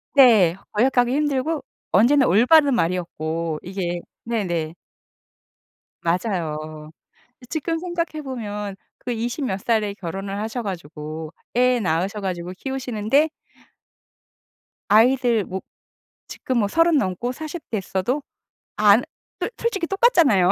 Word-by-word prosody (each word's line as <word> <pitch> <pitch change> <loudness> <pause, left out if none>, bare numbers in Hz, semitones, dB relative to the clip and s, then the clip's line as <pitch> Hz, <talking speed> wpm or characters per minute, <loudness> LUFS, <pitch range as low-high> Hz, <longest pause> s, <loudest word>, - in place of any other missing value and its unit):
네. 220 -11 +7 0.2
거역하기 245 +2 +3
힘들고 295 +1 0 0.3
언제나 260 +8 +5
올바른 275 - +5
말이었고. 165 -4 -2
이게 175 -2 -3 0.2
네네. 175 -9 -1 1.3
맞아요. 155 -5 -2 0.5
이 - - -13
지금 330 +4 -2
생각해 335 -3 -3
보면 210 -6 -5 0.2
그 245 - -5
이십 240 +5 -2
몇 195 -5 -2
살에 220 -3 0
결혼을 195 +1 -5
하셔 225 +3 -3
가지고 155 -3 -6 0.2
애 250 0 +4
낳으셔 190 +2 -1
가지고 180 -2 -4
키우시는데 265 +3 0 1.6
아이들 235 +1 +4
뭐 190 +1 -5 0.7
지금 255 -2 -2
뭐 205 - +2
30 330 +4 +4
넘고 205 +2 -1
40 315 +4 -7
됐어도 205 - -1 0.5
안 210 +3 +6 0.4
솔 - - 0
솔직히 400 -7 -1
똑같잖아요. 335 - +4
220 Hz, 235 characters per minute, -23 LUFS, 185-265 Hz, 1.6 s, 네